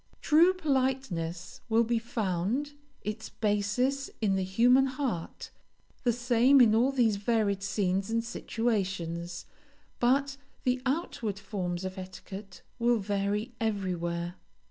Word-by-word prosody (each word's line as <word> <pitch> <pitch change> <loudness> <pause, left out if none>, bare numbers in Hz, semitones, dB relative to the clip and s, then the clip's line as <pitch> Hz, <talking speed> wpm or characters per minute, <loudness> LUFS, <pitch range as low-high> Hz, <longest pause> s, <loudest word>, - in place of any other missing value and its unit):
True 340 +5 +5
politeness 255 - -1
will 225 +1 +4
be 230 0 +1
found, 225 +5 -2 0.3
its 215 +1 -4
basis 225 +6 0
in 200 -4 +2
the 190 - 0
human 245 +8 +4
heart, 260 - -4 0.5
the 245 - +3
same 245 +3 +4
in 230 -4 +6
all 240 +5 +4
these 235 -6 +2
varied 205 -2 +1
scenes 195 0 0
and 230 0 0
situations, 190 -8 -2 0.5
but 270 +3 +2 0.3
the 250 0 +1
outward 250 - -2
forms 185 -3 -4
of 185 0 -5
etiquette 190 +1 -9 0.2
will 240 0 +3
vary 205 +2 -1
everywhere. 175 -5 -2
220 Hz, 120 wpm, -29 LUFS, 190-250 Hz, 0.5 s, in